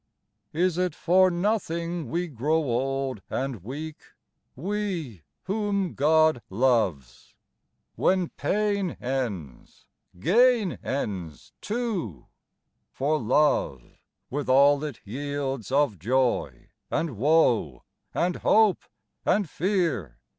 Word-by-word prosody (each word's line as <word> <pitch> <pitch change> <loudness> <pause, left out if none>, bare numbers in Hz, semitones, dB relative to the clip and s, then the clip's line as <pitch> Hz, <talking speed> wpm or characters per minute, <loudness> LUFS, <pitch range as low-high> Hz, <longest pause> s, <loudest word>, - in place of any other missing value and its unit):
'Is 175 +2 +1
it 180 -4 0
for 185 +2 +4
nothing 175 - -1
we 175 +5 -1
grow 150 +3 0
old 135 -3 -1
and 130 -8 -3
weak, 150 +7 -6 0.6
We 175 - -3 0.2
whom 200 -2 -1
God 155 -1 +3
loyes? 100 - 0 0.6
When 185 -2 +1
pain 200 -3 -1
ends, 115 - -5 0.3
gain 225 - +3
ends 95 - -4
too, 205 - -3 0.6
For 150 +3 0
love, 115 - +2 0.5
with 140 0 -3
all 140 +2 +5
it 150 -6 -6
yields 135 0 -4
of 140 - +2
joy 125 +6 0 0.2
and 160 -6 -1
woe 120 - +2 0.3
And 180 0 0
hope 215 -3 +4 0.4
and 205 -2 +2
fear 155 - -1
145 Hz, 95 wpm, -26 LUFS, 120-180 Hz, 0.6 s, all